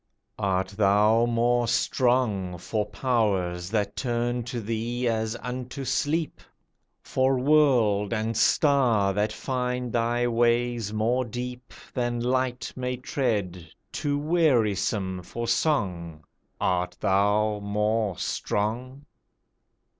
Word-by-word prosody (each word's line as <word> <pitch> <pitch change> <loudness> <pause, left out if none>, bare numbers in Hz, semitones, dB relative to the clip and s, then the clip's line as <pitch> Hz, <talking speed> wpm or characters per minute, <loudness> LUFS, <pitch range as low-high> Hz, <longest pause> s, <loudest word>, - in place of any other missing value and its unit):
Art 95 -1 0
thou 105 +3 +3
more 120 +1 +2
strong 115 -6 +1
For 105 +4 -2
powers 100 -6 0
that 105 -1 -1
turn 120 -1 -1
to 120 0 -4
thee 115 +3 -2
as 110 0 -1
unto 125 +2 -5
sleep? 155 +5 -1 0.6
For 130 0 +1
world 125 -8 +3
and 115 0 -1
star 115 -6 +3
that 105 +2 0
find 125 +1 -3
thy 120 +1 +1
ways 120 -2 +1
more 115 +4 +1
deep 125 +1 -6 0.2
Than 120 -1 -1
light 125 0 -1
may 125 0 -3
tread, 105 - -2 0.3
too 145 -1 -1
wearisome 110 - +1
for 115 +6 -5
song 90 - -1 0.4
Art 90 -1 0
thou 105 +2 +2
more 105 -1 0
strong? 125 +7 -3
115 Hz, 105 wpm, -26 LUFS, 105-125 Hz, 0.6 s, thou